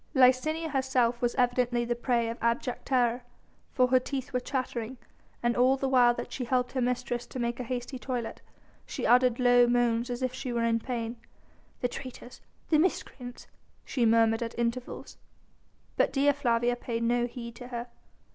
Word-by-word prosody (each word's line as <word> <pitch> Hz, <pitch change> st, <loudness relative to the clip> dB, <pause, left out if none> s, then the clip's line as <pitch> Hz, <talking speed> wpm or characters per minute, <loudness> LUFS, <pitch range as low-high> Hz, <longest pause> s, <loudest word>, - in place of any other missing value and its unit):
Licinia 270 Hz, +6 st, +3 dB
herself 260 Hz, -4 st, +1 dB
was 240 Hz, -1 st, 0 dB
evidently 245 Hz, -1 st, +1 dB
the 240 Hz, -, 0 dB
prey 240 Hz, -1 st, 0 dB
of 230 Hz, +1 st, -5 dB
abject 235 Hz, +2 st, -1 dB
terror, 245 Hz, -2 st, +2 dB, 0.5 s
for 255 Hz, -2 st, +3 dB
her 255 Hz, 0 st, +5 dB
teeth 265 Hz, +1 st, -5 dB
were 250 Hz, -, +2 dB
chattering, 250 Hz, -2 st, -3 dB, 0.5 s
and 240 Hz, 0 st, +2 dB
all 255 Hz, +2 st, +4 dB
the 270 Hz, -, -1 dB
while 245 Hz, -2 st, +5 dB
that -, -, -6 dB
she 260 Hz, -, -4 dB
helped 250 Hz, +1 st, 0 dB
her 260 Hz, -, -1 dB
mistress 245 Hz, 0 st, -1 dB
to -, -, -8 dB
make 235 Hz, 0 st, -2 dB
a -, -, -2 dB
hasty 250 Hz, +2 st, -4 dB
toilet, 245 Hz, -3 st, -4 dB, 0.5 s
she -, -, -4 dB
uttered 250 Hz, 0 st, +4 dB
low 245 Hz, -1 st, +5 dB
moans 240 Hz, 0 st, +1 dB
as 245 Hz, +1 st, -3 dB
if 255 Hz, -1 st, -1 dB
she 260 Hz, -1 st, -4 dB
were 235 Hz, -1 st, 0 dB
in 230 Hz, 0 st, +2 dB
pain. 235 Hz, -1 st, -4 dB, 0.6 s
"The 245 Hz, -, +2 dB
traitors! 250 Hz, 0 st, -9 dB, 0.3 s
the 310 Hz, -, +4 dB
miscreants!" 250 Hz, -7 st, -2 dB, 0.4 s
she 250 Hz, -, -1 dB
murmured 225 Hz, 0 st, +4 dB
at 230 Hz, 0 st, -4 dB
intervals. 235 Hz, +1 st, -3 dB, 0.8 s
But -, -, +3 dB
Dea 285 Hz, +1 st, +3 dB
Flavia 240 Hz, -4 st, +1 dB
paid 230 Hz, -1 st, -3 dB
no 240 Hz, +1 st, +2 dB
heed 235 Hz, -1 st, -8 dB
to 245 Hz, -, -9 dB
her. 240 Hz, -1 st, -5 dB
245 Hz, 175 wpm, -29 LUFS, 235-255 Hz, 0.8 s, her